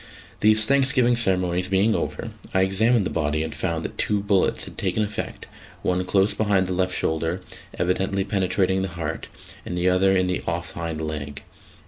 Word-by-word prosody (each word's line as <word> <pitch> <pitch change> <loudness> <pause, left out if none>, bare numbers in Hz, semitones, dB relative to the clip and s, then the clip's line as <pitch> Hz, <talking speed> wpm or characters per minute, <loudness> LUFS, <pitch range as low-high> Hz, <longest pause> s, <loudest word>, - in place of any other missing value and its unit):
These 110 +1 +5
thanksgiving 130 -2 +3
ceremonies 90 -5 +1
being 100 +3 +3
over, 115 +1 -3 0.2
I 95 - +4
examined 105 +3 +2
the - - -2
body 75 -1 0
and 80 - -5
found 85 -3 -2
that - - -7
two 105 -1 +1
bullets 100 -2 +1
had - - -11
taken 110 - 0
effect 105 0 -5 0.4
one 90 0 +1
close 95 +3 +2
behind 100 -3 +2
the 90 - -2
left 90 0 0
shoulder, 80 +3 -1 0.4
evidently 95 +2 0
penetrating 95 -1 0
the 95 - -1
heart, 80 -1 -4 0.4
and 90 - -5
the 90 +1 +2
other 95 +1 +3
in 95 - +2
the 90 0 -1
off - - -2
hind 85 -2 -4
leg. 75 -2 -5
95 Hz, 175 wpm, -24 LUFS, 90-105 Hz, 0.4 s, These